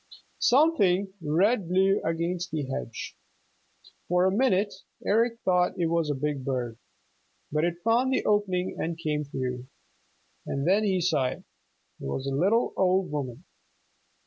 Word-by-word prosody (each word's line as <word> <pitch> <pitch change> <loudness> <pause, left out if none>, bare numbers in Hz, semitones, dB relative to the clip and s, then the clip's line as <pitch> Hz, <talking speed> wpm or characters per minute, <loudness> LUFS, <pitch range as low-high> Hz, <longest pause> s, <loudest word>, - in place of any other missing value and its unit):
Something 200 - +3
red 180 +6 +2
blew 190 +2 +3
against 170 +2 -2
the 155 -4 -2
hedge. 130 -3 -5 0.9
For 180 +1 +3
a 190 - +3
minute 205 -2 +2 0.3
Eric 230 +2 +2
thought 180 0 +2
it 170 -2 0
was 165 -2 +1
a 145 - 0
big 140 0 -2
bird. 125 -3 -3 0.7
But 150 +2 +1
it 175 0 -3
found 240 +4 +3
the 260 - 0
opening 190 -3 0
and 165 0 -2
came 150 -2 -2
through, 130 -2 -4 0.8
and 140 +3 -2
then 200 +4 +4
he 190 -3 +1
saw 140 -6 +2
it - - -6 0.6
was 70 - -4
a 135 - -2
little 195 - +2
old 185 -1 +2
woman. 140 -1 -4
175 Hz, 145 wpm, -27 LUFS, 145-195 Hz, 0.9 s, then